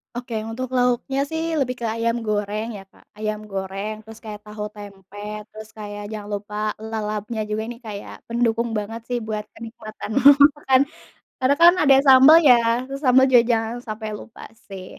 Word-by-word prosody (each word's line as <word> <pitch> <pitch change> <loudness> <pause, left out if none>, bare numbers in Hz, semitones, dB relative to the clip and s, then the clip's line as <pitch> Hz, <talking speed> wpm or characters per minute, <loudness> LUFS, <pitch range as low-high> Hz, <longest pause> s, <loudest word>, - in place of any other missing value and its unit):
Oke 240 -1 -5
untuk 255 +3 -4
lauknya 250 +2 +1
sih 320 0 -3 0.2
lebih 255 -2 -1
ke - - -2
ayam 230 0 0
goreng 210 +1 -2
ya 195 - -9
Kak, - - -23 0.2
ayam 215 0 -2
goreng 195 +2 -4
terus 225 0 -12
kayak 210 -1 -7
tahu 210 0 -7
tempe, 200 -1 -12 0.3
terus 215 0 -11
kayak 205 -1 -7
jangan 210 -1 -7
lupa 205 +1 -8 0.2
lalapnya 220 0 -4
juga 215 +1 -2
ini 240 - -7
kayak 205 -1 -7
pendukung 235 0 0
banget 225 +2 -5
sih 245 - 0
buat 215 -1 -3
kenikmatan 225 -2 -9 0.5
makan, 265 -2 +3 0.6
karena 260 +2 +3
kan 345 +1 +9
ada 275 -2 +6
sambal 270 +4 +9
ya, 250 - +9 0.3
terus 275 +1 -7
sambal 255 +1 +6
juga 245 -2 +7
jangan 225 0 -1
sampai 215 0 -5
lupa 225 - -13 0.3
sih, 190 -2 -8
220 Hz, 170 wpm, -22 LUFS, 210-245 Hz, 0.6 s, kan